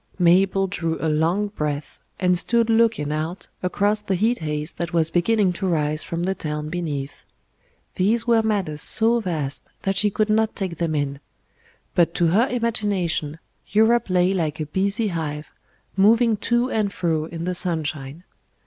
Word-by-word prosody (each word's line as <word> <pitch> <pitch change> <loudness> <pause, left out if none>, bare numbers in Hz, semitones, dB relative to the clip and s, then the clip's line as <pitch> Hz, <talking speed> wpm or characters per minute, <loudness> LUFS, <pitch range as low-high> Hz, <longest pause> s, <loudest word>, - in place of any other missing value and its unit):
Mabel 190 +2 +3
drew 170 -4 -2
a - - -3
long 170 +7 +1
breath, 150 -6 -4 0.2
and 180 -1 +3
stood 230 +5 +1
looking 225 -10 +2
out 160 +4 -4
across 205 +3 0
the 200 -2 -1
heat 225 +6 +1
haze 150 -1 -3
that 170 0 -5
was 165 -1 +2
beginning 190 +1 +2
to 190 +2 -3
rise 155 -3 0
from 170 +1 -4
the 190 +2 0
town 150 -3 -4
beneath. 150 -5 -4 0.7
These 220 +5 +1
were 230 -2 +4
matters 195 -9 -1
so 230 +2 +4
vast 155 -9 -3
that 195 0 0
she 210 +2 +3
could 215 +1 0
not 220 0 +1
take 185 -4 -4
them 165 -2 -1
in. 140 -1 -2 0.7
But 170 -1 +2
to 170 -2 +2
her 220 +9 +3
imagination 205 - -1 0.3
Europe 220 +2 +3
lay 180 +1 +2
like 160 -6 -2
a 155 - -2
busy 200 - 0
hive, 155 -3 -4 0.4
moving 225 +4 +4
to 240 +2 +2
and 210 -2 0
fro 165 -5 -1
in 165 0 -7
the 180 +1 -1
sunshine. 155 -3 -1
180 Hz, 165 wpm, -22 LUFS, 160-210 Hz, 0.7 s, were